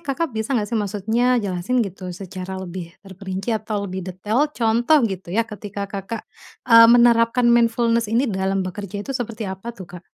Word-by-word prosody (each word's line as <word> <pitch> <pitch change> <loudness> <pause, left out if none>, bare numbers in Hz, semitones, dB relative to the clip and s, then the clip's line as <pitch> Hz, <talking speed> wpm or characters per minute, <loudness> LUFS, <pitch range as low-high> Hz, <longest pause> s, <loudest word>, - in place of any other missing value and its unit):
Kakak 290 +4 -1
bisa 220 0 -2
nggak 210 - 0
sih 230 -2 -1
maksudnya 210 +4 -1 0.2
jelasin 190 +6 -2
gitu 185 -1 -7
secara 190 0 -6
lebih 175 -2 -7
terperinci 190 +2 -5
atau 215 -2 -2
lebih 190 -1 -5
detail 210 +11 0
contoh 235 +6 +3
gitu 190 -4 -4
ya 230 - +3
ketika 205 -2 -8
Kakak, 200 +3 -6 0.4
eee, 230 -1 +8
menerapkan 235 0 +5
mindfulness 230 -1 +2
ini 235 +5 +2
dalam 190 -3 -1
bekerja 200 +2 -6
itu 270 - -4
seperti 225 -1 -4
apa 190 +5 -9
tuh 185 - -8
Kak? 175 -1 -10
210 Hz, 170 wpm, -21 LUFS, 190-230 Hz, 0.4 s, eee